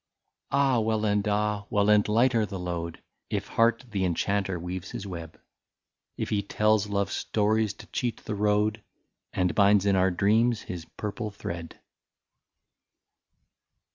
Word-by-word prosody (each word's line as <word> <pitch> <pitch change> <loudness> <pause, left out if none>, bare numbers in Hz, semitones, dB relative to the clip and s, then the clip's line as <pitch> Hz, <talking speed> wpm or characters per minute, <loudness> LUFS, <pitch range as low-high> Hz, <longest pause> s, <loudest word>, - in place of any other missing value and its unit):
Ah! 135 -3 +3
well, 110 -1 0
and 105 0 +1
ah! 105 -1 0
well, 105 -1 +2
and 105 -1 +4
lighter 115 +2 +3
the 100 -2 -4
load. 85 -2 -5 0.3
If 100 -1 -2
heart 115 +3 +2
the 100 -2 -1
enchanter 95 +1 0
weaves 90 +2 -5
his 100 - -6
web; 85 -4 -8 0.8
If - - -3
he 105 - +1
tells 105 +1 +2
love 100 -1 0
stories 105 -1 0
to - - -12
cheat 120 -4 -2
the 110 - -3
road, 105 +1 +1 0.5
And 90 -2 0
binds 100 0 +4
in 100 -1 +3
our 95 0 +4
dreams 110 +5 +2
his 85 -3 -6
purple 105 +1 -3
thread. 85 -5 -7
105 Hz, 140 wpm, -27 LUFS, 95-110 Hz, 0.8 s, and